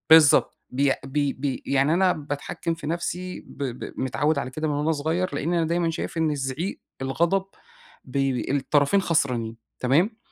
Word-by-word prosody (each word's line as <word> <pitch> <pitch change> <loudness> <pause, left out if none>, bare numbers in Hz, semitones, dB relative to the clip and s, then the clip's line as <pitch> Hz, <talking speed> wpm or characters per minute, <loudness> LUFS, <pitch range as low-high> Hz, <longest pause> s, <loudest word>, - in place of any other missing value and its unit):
بالضبط، 160 -3 +7
بيأ 135 +2 +2
بي 140 +1 0
بي 135 -1 -3
يعني 140 +3 +3
أنا 185 +1 +4
باتحكّم 145 +2 -3
في 165 -3 -7
نَفسي 175 +2 -3
ب 145 - -8
ب 125 -2 -5
متعوّد 145 +4 +1
على 130 - -3
كده 155 +4 -3
من 150 - 0
وأنا 150 +2 +1
صغيّر، 160 +2 -1
لإني 170 +5 0
أنا 165 - +1
دايمًا 170 0 +1
شايف 165 +1 -4
إن 160 -1 +2
الزعيق 140 +6 -3 0.2
الغضب 170 +8 +1 0.6
بيب 135 0 0
الطرفين 145 +7 +3
خسرانين، 125 -10 0 0.2
تمام؟ 165 - +2
145 Hz, 165 wpm, -25 LUFS, 135-165 Hz, 0.6 s, بالضبط